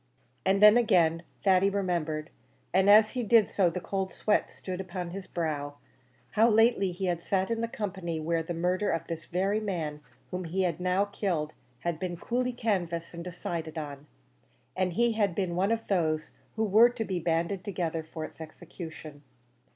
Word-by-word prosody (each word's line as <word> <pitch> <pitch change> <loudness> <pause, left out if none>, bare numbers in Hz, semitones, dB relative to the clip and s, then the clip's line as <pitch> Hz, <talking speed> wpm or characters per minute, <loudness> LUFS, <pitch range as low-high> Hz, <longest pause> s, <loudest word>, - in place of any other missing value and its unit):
And 195 +2 +3
then 210 +2 +9
again, 175 -8 +3 0.2
Thady 190 0 +4
remembered 170 -6 -2 0.4
and 190 +2 +4
as 215 +1 +7
he 250 - -2
did 225 -1 +5
so 185 -4 +2
the 170 - -4
cold 190 +1 -3
sweat 210 - +1
stood 185 0 -6
upon 180 -2 -5
his 195 +1 -7
brow 145 -4 -3 0.6
how 225 +2 +4
lately 225 -3 +4
he 180 +2 -4
had 175 -2 -1
sat 190 +2 0
in 230 0 -1
company 190 -7 -4
where 165 +1 0
the 165 +1 -5
murder 180 +4 0
of 165 0 -1
this 165 -2 -6
very 195 +4 0
man 165 -8 -3 0.3
whom 180 0 -3
now 170 - -6
he 190 +3 0
had 180 +3 0
killed 165 -8 -1 0.3
had 170 +2 -2
been 175 -1 -3
coolly 250 +7 -1
canvassed 175 -9 -2
and 170 0 -6
decided 170 -2 -5
on, 145 -1 -6 0.7
and 185 -1 0
he 235 +5 +3
had 205 -5 +1
been 180 -2 -1
one 195 +4 +1
of 225 0 -1
those 155 -5 0 0.2
who 220 - 0
were 220 +3 +6
to 240 -2 -4
be 185 -3 -2
banded 170 +3 -1
together 170 -5 -2
for 160 0 -6
its 160 - -12
execution. 160 -2 -9
180 Hz, 180 wpm, -29 LUFS, 165-200 Hz, 0.7 s, then